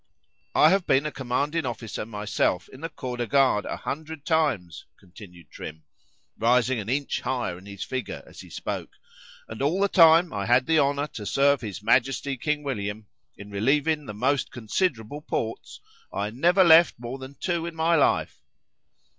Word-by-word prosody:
—I 155 - +6
have 195 -1 +1
been 135 +3 +3
a 150 - -2
commanding 140 +6 -1
officer 115 -4 -5
myself 105 -4 -1
in 130 - -13
the 165 - -4
Corps 125 -5 -6
de 120 -1 -2
Garde 130 -4 +3
a - - -4
hundred 155 0 -6
times, 135 - 0
continued 90 -2 -15
Trim, 80 0 -9 0.6
rising 125 +1 +2
an 105 0 -6
inch 140 +2 -1
higher 125 -8 -2
in 95 - -15
his 100 -2 -6
figure, 130 -4 -5
as - - -15
he - - -11
spoke,—and 110 - -9
all 155 +7 +1
the 200 - +3
time 165 -2 +6
I 100 -1 -3
had 125 +2 +4
the 160 -1 +3
honour 140 0 +1
to 105 -8 -8
serve 140 0 +3
his 105 -3 -7
Majesty 135 +4 +1
King 150 +3 -2
William, 105 -5 -4 0.3
in 100 0 -11
relieving 145 +8 +1
the 105 - -6
most 135 +5 0
considerable 120 - -2
posts, 115 -7 -4 0.3
I 105 +1 -3
never 175 - +4
left 170 0 +6
more 120 +3 -7
than 130 +1 -10
two 170 -2 -1
in 170 - -7
my 165 +1 +2
life. 150 - +1
130 Hz, 170 wpm, -25 LUFS, 110-155 Hz, 0.6 s, I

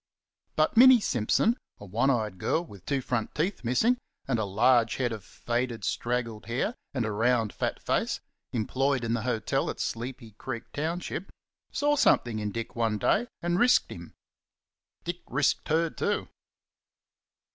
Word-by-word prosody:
But 155 +6 +2
Minnie 255 +1 +9
Simpson, 200 - +2 0.2
a 105 - -9
one 115 +8 +1
eyed 110 -7 0
girl 165 - 0
with 100 - -14
two 140 -2 0
front 120 -3 -2
teeth 175 +3 -1
missing 220 - +2 0.3
and 125 -4 +1
a 110 - 0
large 115 +4 +3
head 125 -3 0
of 110 -4 -5
faded, 120 +1 -3
straggled 115 -3 -2
hair 120 - -1 0.2
and 125 -4 -1
a 110 - -2
round 115 0 +1
fat - - -2
face, - - 0 0.3
employed 130 +3 0
in 115 0 0
the 120 - 0
hotel 115 -2 0
at - - -5
Sleepy 120 0 -4
Creek 120 -3 -4
township, 170 +4 -3 0.4
saw 290 0 +2
something 120 - +3
in 105 -1 -2
Dick 115 +2 -5
one 115 -2 +1
day 225 - +2 0.2
and 175 +1 +1
risked 250 +2 +4
him. - - -10 0.9
Dick 175 +1 -4
risked 135 +2 +1
her 160 +1 +2
too. - - -1
125 Hz, 155 wpm, -28 LUFS, 115-155 Hz, 0.9 s, Minnie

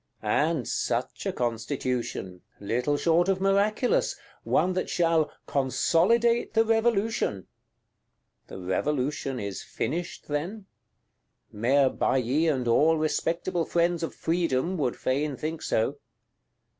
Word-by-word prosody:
And - - +1
such - - -2
a - - +1
Constitution; 120 -5 -3 0.2
little 125 +8 0
short 170 +4 +2
of 190 -1 +2
miraculous: 200 +5 +2 0.3
one 185 - +2
that 185 - -2
shall 165 -3 +2
"consolidate 220 - +2
the 225 0 +4
Revolution"! 225 - +1 1.0
The - - -9
Revolution 130 +7 -1
is 100 -2 -4
finished, 170 +4 -4
then? 175 +8 -3 0.9
Mayor 130 +5 +3
Bailly 135 +7 +1
and 130 -6 0
all 155 +7 +4
respectable 165 +3 -1
friends 170 +1 +1
of 165 - -4
Freedom 165 -1 0
would 130 -6 0
fain 140 +1 -1
think 160 +1 -4
so. 135 +6 0
155 Hz, 110 wpm, -27 LUFS, 130-180 Hz, 1.0 s, the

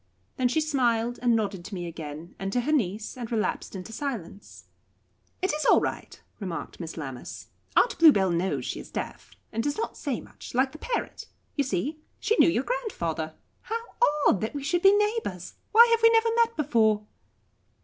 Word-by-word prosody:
Then 255 - +3
she 285 +6 +1
smiled 245 -6 +1
and 240 -2 +3
nodded 200 -5 -1
to 205 - -6
me 175 -1 -4
again, 160 0 -7
and 195 0 -3
to 245 - +2
her 295 - -1
niece, 215 -7 0
and 245 -3 -6
relapsed 220 -2 -1
into 190 +4 -7
silence. 225 - -6 0.8
"It 375 - +2
is 305 - -1
all - - +6
right," - - -4 0.2
remarked 185 -5 -5
Miss 165 -2 -6
Lammas. 135 -5 -7 0.3
"Aunt - - +3
Bluebell 205 - +6
knows 175 +3 -1
she - - -3
is - - -10
deaf, - - -6 0.2
and 225 - -1
does 290 +4 -1
not 450 - -3
say 275 -6 -3
much, - - -11
like 265 +1 +3
the 310 - -11
parrot. 480 +6 -3 0.3
You 285 - +2
see, 270 - -2 0.2
she 445 - +1
knew - - +7
your 265 -6 +1
grandfather. 170 - -3 0.3
How 450 - -2 0.5
odd, 195 - +3
that 220 +6 -3
we 285 - -4
should 340 +5 +1
be 390 +1 +8
neighbours! 420 - -1 0.2
Why 465 +2 +9
have 460 0 +3
we 455 - +8
never 455 0 +4
met 465 0 +2
before?" 220 -8 +2
240 Hz, 190 wpm, -27 LUFS, 190-310 Hz, 0.8 s, Why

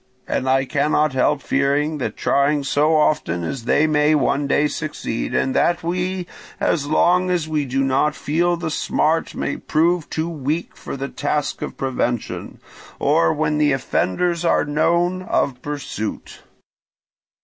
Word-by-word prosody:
And 130 - -1
I 135 0 +3
cannot 150 +1 +1
help 140 +3 +1
fearing 145 +2 +1
that 115 -5 -3
trying 140 +1 +2
so 150 +3 +2
often 90 - +1
they 150 +5 +3
may 150 0 +3
one 145 -1 +1
day 145 +1 +2
succeed, 150 -6 -4
and 130 - +1
that 175 -1 +2
we, 180 +2 -2 0.3
as 145 -4 0
long 180 +4 +3
as 175 -3 0
we 155 -2 -1
do 135 +1 0
not 135 +3 +1
feel 170 +3 0
the 165 -2 -3
smart, 160 +2 0
may - - -2
prove 165 +1 +1
too 160 +1 -2
weak 155 +1 -3
for - - -7
the 135 +1 -3
task 145 0 -2
of - - -5
prevention, 125 -3 -3 0.4
or, 85 0 +3
when 150 0 0
the 150 -2 +3
offenders 165 - 0
are 170 - +2
known, 170 +5 +1
of 135 -8 -1
pursuit. 145 -7 -5
150 Hz, 150 wpm, -21 LUFS, 135-165 Hz, 0.4 s, I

